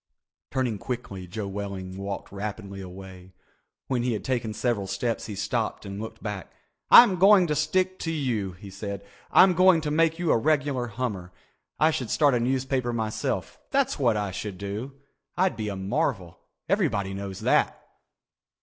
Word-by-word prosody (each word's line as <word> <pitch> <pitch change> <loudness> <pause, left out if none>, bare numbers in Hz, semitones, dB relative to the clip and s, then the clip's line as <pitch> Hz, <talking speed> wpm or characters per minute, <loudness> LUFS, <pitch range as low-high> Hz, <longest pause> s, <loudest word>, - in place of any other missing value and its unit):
Turning 125 -6 -1
quickly, 100 -7 -5
Joe 105 +3 -5
Welling 95 -2 -5
walked 100 0 -5
rapidly 100 -1 -6
away. 95 0 -11 0.5
When 125 -3 0
he 120 0 0
had 105 - -4
taken 120 -4 -1
several 105 -2 -1
steps 110 +5 -2
he 105 - -5
stopped 110 +2 -2
and 100 +1 -6
looked 110 0 -8
back. 105 -5 -5 0.4
"I'm 200 -6 +9
going 195 -1 +7
to 150 -3 0
stick 185 +5 +1
to 165 - -2
you," 120 - -1
he 100 +2 -11
said. 100 0 -6 0.2
"I'm 185 0 +7
going 185 -1 +6
to 150 -1 -2
make 165 +1 +2
you 170 -2 +1
a - - +4
regular 140 -3 +1
hummer. 105 -6 -4 0.5
I 155 +1 +5
should 125 -7 -3
start 145 -3 +3
a 120 - +2
newspaper 130 0 0
myself, 110 -2 -2
that's 275 - +1
what 120 -5 +3
I 100 -2 -2
should 100 0 -5
do. 100 +7 -5 0.4
I'd 185 +1 +2
be 110 -1 -4
a 100 - -4
marvel. 95 - -2 0.3
Everybody 95 -1 +1
knows 95 -1 -6
that." - - +2
110 Hz, 165 wpm, -26 LUFS, 100-140 Hz, 0.5 s, I'm